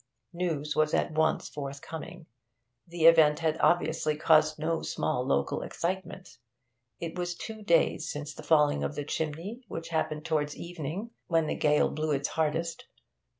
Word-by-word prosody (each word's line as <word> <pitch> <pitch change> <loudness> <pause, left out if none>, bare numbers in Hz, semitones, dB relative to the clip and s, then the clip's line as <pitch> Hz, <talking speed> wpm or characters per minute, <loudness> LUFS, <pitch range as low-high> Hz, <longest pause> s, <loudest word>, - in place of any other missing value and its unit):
News 160 -4 -2
was 155 0 +2
at - - +1
once 160 +1 +1
forthcoming; 150 +4 -7 0.6
the 170 -1 -1
event 160 -3 +7
had 160 -1 0
obviously 160 -3 +2
caused 155 -1 +4
no 160 +2 -1
small - - -1
local 70 0 0
excitement. 180 -5 -4 0.6
It 165 -1 -5
was 175 0 -3
two 220 +4 -7
days 170 -5 +2
since 150 0 -6
the - - -10
falling 150 -1 +3
of 150 - -2
the 145 0 -4
chimney, 165 - -4
which 165 -3 -6
happened 155 -1 -2
towards 150 -2 -1
evening, 175 +6 -5 0.2
when 165 -2 +2
the - - -1
gale 150 -1 +2
blew 155 +1 -2
its 140 0 -1
hardest. 160 +2 -1
160 Hz, 150 wpm, -29 LUFS, 150-170 Hz, 0.6 s, event